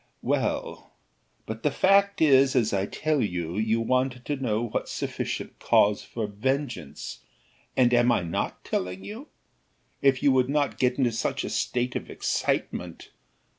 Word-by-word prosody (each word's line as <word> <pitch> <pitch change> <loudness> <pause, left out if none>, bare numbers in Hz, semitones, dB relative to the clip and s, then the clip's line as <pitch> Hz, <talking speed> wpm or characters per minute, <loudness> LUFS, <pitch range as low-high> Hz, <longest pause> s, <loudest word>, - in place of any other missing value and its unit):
"Well, - - -2 0.5
but 110 +1 -6
the 150 - +2
fact 200 +6 +3
is 135 -3 +5
as 115 -5 +2
I 100 0 0
tell 155 -3 0
you; 90 -5 -2
you 110 +1 +1
wanted 125 +1 0
to 145 - -1
know 120 -5 -1
what - - -3
sufficient - - -4
cause 100 0 +3
for 115 -2 -4
vengeance, 110 - -3 0.6
and 125 -1 +4
am 120 0 +4 0.2
not - - 0
I - - -21
telling 90 +1 -2
you? 235 +8 -8 0.7
If 135 -2 +3
you 140 - +5
would 130 0 +3
not 145 -1 0
get 125 -1 +2
into 125 -4 +2
such 115 - -2
a - - -4
state 125 0 -1
of - - -4
excitement! - - -2
125 Hz, 155 wpm, -26 LUFS, 110-140 Hz, 0.7 s, is